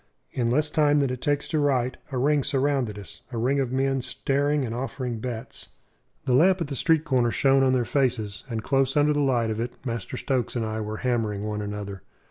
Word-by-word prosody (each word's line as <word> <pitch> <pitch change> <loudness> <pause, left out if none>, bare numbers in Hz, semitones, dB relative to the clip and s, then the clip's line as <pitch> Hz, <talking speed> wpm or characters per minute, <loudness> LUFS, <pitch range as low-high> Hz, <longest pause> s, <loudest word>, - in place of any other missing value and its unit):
In 120 -2 0
less 150 +4 +1
time 150 -1 +3
than 140 -3 +2
it 125 -1 -5
takes 145 0 0
to 155 - +1
write, 130 -3 +1
a 130 - -2
ring 145 +2 +2
surrounded 135 -6 0
us 100 +1 -11
a 120 - -4
ring 130 +5 +1
of 130 -3 -1
men 135 0 +1
staring 140 +2 0
and 115 - -4
offering 125 -1 -4
bets. 120 +1 -6 0.6
The 125 - +1
lamp 180 +8 +5
at 165 - -3
the 140 - -3
street 160 +2 +2
corner 130 -6 +2
shone 135 +5 +3
on 130 -1 +3
their 125 -2 +1
faces; 115 -8 -1
and 110 -2 -3
close 135 +1 +1
under 150 +1 +4
the 145 - 0
light 120 -5 +2
of 110 - -3
it 120 +1 -3
Master 115 0 -4
Stokes 130 -3 -1
and 115 -2 0
I 110 0 -3
were 110 0 -4
hammering 110 -5 0
one 105 0 -3
another. 100 -2 -5
130 Hz, 220 wpm, -25 LUFS, 115-140 Hz, 0.6 s, lamp